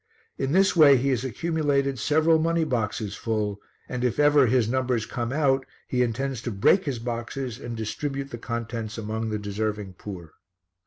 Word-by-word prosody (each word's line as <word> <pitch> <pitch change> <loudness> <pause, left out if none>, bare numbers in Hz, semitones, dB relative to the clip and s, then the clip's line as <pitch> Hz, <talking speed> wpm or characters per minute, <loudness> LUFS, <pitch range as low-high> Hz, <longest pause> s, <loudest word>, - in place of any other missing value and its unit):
In 135 - -1
this 190 +3 +4
way 145 -5 +8
he 135 +3 0
has 130 -2 0
accumulated 140 -1 0
several 160 +5 +3
money 165 +1 +1
boxes 110 -7 -2
full, 105 -3 -2 0.3
and 125 -1 -4
if 125 -3 0
ever 145 -2 +5
his 120 -1 +3
numbers 125 -2 0
come 120 -1 -3
out 135 -2 +2 0.2
he 125 - 0
intends 125 +1 -1
to 120 - -3
break 110 - +3
his 140 -4 -2
boxes 120 +1 -4
and 120 -1 -6
distribute 135 +5 -4
the 120 - -6
contents 115 -1 -4
among 110 0 -3
the 110 - -1
deserving 105 -1 -3
poor. 90 -6 -8
125 Hz, 170 wpm, -25 LUFS, 110-140 Hz, 0.3 s, way